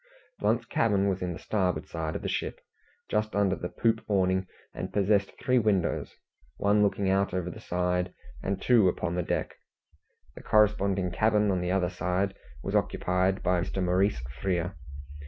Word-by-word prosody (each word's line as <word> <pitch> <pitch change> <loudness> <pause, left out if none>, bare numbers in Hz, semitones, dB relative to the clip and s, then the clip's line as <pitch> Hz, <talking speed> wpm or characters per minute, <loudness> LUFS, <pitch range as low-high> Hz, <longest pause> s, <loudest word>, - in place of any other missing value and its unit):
Blunt's - - +1
cabin 100 -3 +2
was 95 -1 -2
in 90 -1 -2
the - - -7
starboard 90 -6 -1
side 80 -2 -4
of - - -4
the - - -2
ship, - - -3 0.5
just 105 0 -1
under 100 -2 +2
the 90 - -5
poop 115 -1 +1
awning, 95 -2 +1 0.3
and - - -5
possessed 100 0 +2
three 125 0 +3
windows 100 -6 0 0.4
one 100 +1 +3
looking 100 -1 +1
out 95 0 +1
over 90 -1 -2
the - - -10
side, 90 0 -1 0.3
and 95 0 -2
two 115 -7 +5
upon 85 -1 -2
deck. - - -2 0.8
The - - -11
corresponding 100 -3 +2
cabin 105 0 +2
on 90 -2 0
the 90 - -2
other 90 -1 +1
side 95 +2 -1 0.3
was - - -3
occupied 95 +1 +1
by 90 -1 +2
Mr. 95 +1 -2
Maurice 90 - +2 0.2
Frere. 90 -1 -1
95 Hz, 165 wpm, -28 LUFS, 90-100 Hz, 0.8 s, two